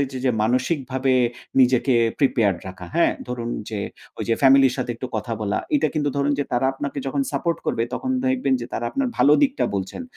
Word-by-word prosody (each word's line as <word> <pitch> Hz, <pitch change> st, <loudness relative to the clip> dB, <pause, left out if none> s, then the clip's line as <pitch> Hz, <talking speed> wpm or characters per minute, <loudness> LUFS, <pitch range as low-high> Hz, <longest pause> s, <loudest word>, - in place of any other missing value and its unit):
ওই -, -, -12 dB
যে, 130 Hz, -, -4 dB
যে, -, -, +4 dB
মানসিকভাবে 130 Hz, +2 st, 0 dB, 0.5 s
নিজেকে 130 Hz, +1 st, +3 dB, 0.2 s
প্রিপেয়ার্ড 110 Hz, -, +2 dB
রাখা 90 Hz, -1 st, -9 dB
হ্যাঁ, 170 Hz, -, +3 dB, 0.2 s
ধরুন 120 Hz, -1 st, -4 dB, 0.2 s
যে, 105 Hz, -, -3 dB, 0.4 s
ওই -, -, -2 dB
যে, 115 Hz, -, +3 dB
ফ্যামিলির 135 Hz, -1 st, +6 dB
সাথে 125 Hz, -2 st, -3 dB
একটু 130 Hz, -, -5 dB
কথা 110 Hz, +2 st, -4 dB
বলা 105 Hz, -1 st, -1 dB, 0.2 s
এটা 285 Hz, -, +1 dB
কিন্তু 150 Hz, -2 st, 0 dB
ধরুন 140 Hz, +1 st, +1 dB
যে, 145 Hz, -, 0 dB
তারা 125 Hz, +2 st, +2 dB
আপনাকে 140 Hz, +1 st, -5 dB
যখন 140 Hz, +1 st, 0 dB
সাপোর্ট 165 Hz, +4 st, -1 dB
করবে 115 Hz, -, 0 dB
তখন 260 Hz, -, -3 dB, 0.2 s
দেখবেন 255 Hz, -, +1 dB
যে, 120 Hz, -, -5 dB
তারা 120 Hz, -, -3 dB
আপনার 275 Hz, -1 st, -1 dB
ভালো 145 Hz, -, +6 dB
দিকটা 280 Hz, 0 st, +2 dB
বলছেন, 95 Hz, -, -4 dB
130 Hz, 200 wpm, -22 LUFS, 120-145 Hz, 0.5 s, ফ্যামিলির